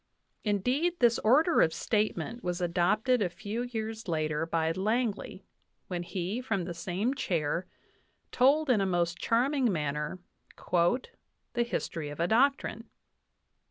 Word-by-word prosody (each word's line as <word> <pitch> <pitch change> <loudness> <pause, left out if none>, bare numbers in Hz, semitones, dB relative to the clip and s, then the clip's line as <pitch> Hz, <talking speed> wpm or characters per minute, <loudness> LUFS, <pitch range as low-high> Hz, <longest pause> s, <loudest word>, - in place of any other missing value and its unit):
Indeed, 250 - +1
this 240 -4 +4
order 305 +9 +4
of 160 - +4
statement 220 +5 -1
was 180 0 -2
adopted 195 +8 +2
a 185 - +1
few 210 +5 -5
years 225 -3 -4
later 155 -1 -1
by 165 -1 +1
Langley, 205 0 -2 0.4
when 180 -2 -2
he, 185 +6 -3
from 220 -7 -1
the 175 0 -5
same 185 +8 -1
chair, 170 - -1 0.6
told 275 +3 +4
in 215 -5 +3
a 195 - +1
most 170 -2 0
charming 255 +1 +2
manner 150 0 -2 0.4
"The 175 +6 +2 0.7
History 165 -9 -3
of 145 - -8
a 170 - +2
Doctrine." 235 -1 +1
205 Hz, 130 wpm, -29 LUFS, 170-240 Hz, 0.7 s, this